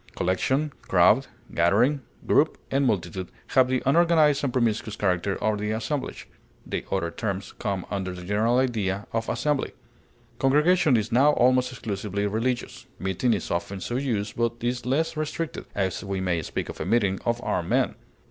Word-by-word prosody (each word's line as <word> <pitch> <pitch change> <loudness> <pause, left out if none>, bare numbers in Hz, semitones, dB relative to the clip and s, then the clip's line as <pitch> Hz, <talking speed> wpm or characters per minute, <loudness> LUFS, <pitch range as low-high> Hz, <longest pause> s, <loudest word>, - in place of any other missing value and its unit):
Collection, 130 +11 0
crowd, 95 +9 +4 0.3
gathering, 115 - +3 0.2
group, - - +3
and 135 0 +2
multitude 95 -3 -2 0.2
have 130 -1 +4
the 130 0 0
unorganized 155 -1 +4
and 140 - 0
promiscuous 115 -4 0
character 95 0 0
of 110 -1 0
the 105 0 -2
assemblage; 120 +6 -3 0.4
the - - -3
other 90 -4 0
terms 100 -2 -4
come 100 -3 -2
under 95 -2 -2
the 90 0 -8
general 110 +6 +1
idea 105 -6 0
of 115 0 -1
assembly. 150 -2 0 0.7
Congregation 150 +1 +4
is 110 0 -2
now 140 +5 +5
almost 125 0 +3
exclusively 100 -4 -3
religious; 115 +4 -2
meeting 95 +6 0
is 100 -6 -1
often 95 +3 -2
so 120 - -4
used, 110 -6 -1
but 115 0 +1
is 120 +1 -2
less 160 +6 +1
restricted, 155 +1 -3
as 95 -2 -1
we 100 -1 -3
may 90 -3 0
speak - - -4
of - - -7
a - - -2
meeting 100 -5 +2
of 120 0 0
armed - - -1
men. - - +2
115 Hz, 165 wpm, -26 LUFS, 95-130 Hz, 0.7 s, now